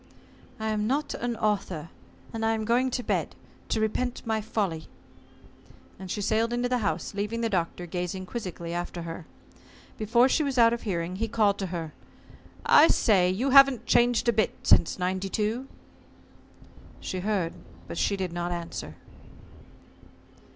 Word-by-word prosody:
"I'm 215 -1 -1
not 285 +4 -1
an 240 0 -3
author, 195 -7 -1 0.4
and 225 0 -3
I 225 0 +2
am 220 -1 -3
going 245 +3 +2
to 245 0 -3
bed, - - -1 0.3
to - - 0
repent 240 +3 -1
of - - -20
my 220 -1 0
folly," 200 -7 -2 1.1
and 190 -1 -8
she 205 - -2
sailed 225 +2 +1
into 245 +1 0
the 250 0 0
house, 170 -5 -2
leaving 210 +3 -2
the 230 -1 -1
Doctor 175 -1 -1
gazing 180 +2 -4
quizzically 180 -5 -6
after 175 0 -4
her. 165 0 -7 0.7
Before 235 +4 +4
she 270 - +2
was 275 -3 -1
out 230 -1 +6
of 235 - -3
hearing, 180 -3 -3
he 225 +3 -1
called 210 -3 +2
to 195 - -2
her: 165 -3 -5 0.7
"I 310 - +7
say, 190 - +3
you 240 +9 0
haven't 275 -3 +7
changed 240 0 +3
a 235 - +4
bit 215 -2 +1
since 170 - +4
'92." 195 +7 -2 1.3
She 185 - -4
heard 185 -4 -1 0.3
but - - -5
she 200 - +1
did 185 -3 -3
not 175 0 -3
answer. 170 -1 -5
210 Hz, 160 wpm, -27 LUFS, 180-235 Hz, 1.3 s, I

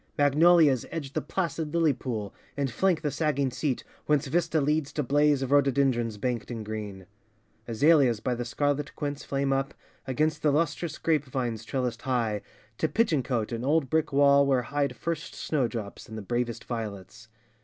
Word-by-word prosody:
Magnolias 145 -1 +5
edge 145 -5 -5
the - - -1
placid 165 -4 -3
lily 165 -3 +4
pool 115 -6 -5 0.2
And 140 -3 -1
flank 180 +3 +1
the 150 - 0
sagging 140 -4 0
seat, 130 0 -2 0.2
whence 150 0 +2
vista 160 +2 +1
leads 150 0 0
To 150 - -1
blaze 145 +1 +3
of 135 - -4
rhododendrons 130 -5 +2
banked 120 +1 -2
in 115 -3 -5
green. 105 -3 -6 0.6
Azaleas 130 -1 +4
by 125 - -1
the 120 0 -3
scarlet 145 +4 -1
quince 145 -1 -4
flame 135 0 0
up 135 0 -1 0.3
Against 155 +4 0
the 150 - +3
lustrous 155 +1 0
grape 155 -3 +1
vines 120 -4 -3
trellised 125 -1 -2
high 115 -6 0 0.4
To 160 - +2
pigeon 215 - +2
cote 120 -3 -2
and 115 0 -3
old 145 -1 +1
brick 160 0 +1
wall 140 0 +5
where 130 -2 +2
hide 140 +3 -1
First 165 -2 -4
snowdrops 120 -10 -3
and 110 - -7
the 110 - -6
bravest 120 +1 -2
violets. 110 -1 -6
135 Hz, 170 wpm, -27 LUFS, 120-150 Hz, 0.6 s, Magnolias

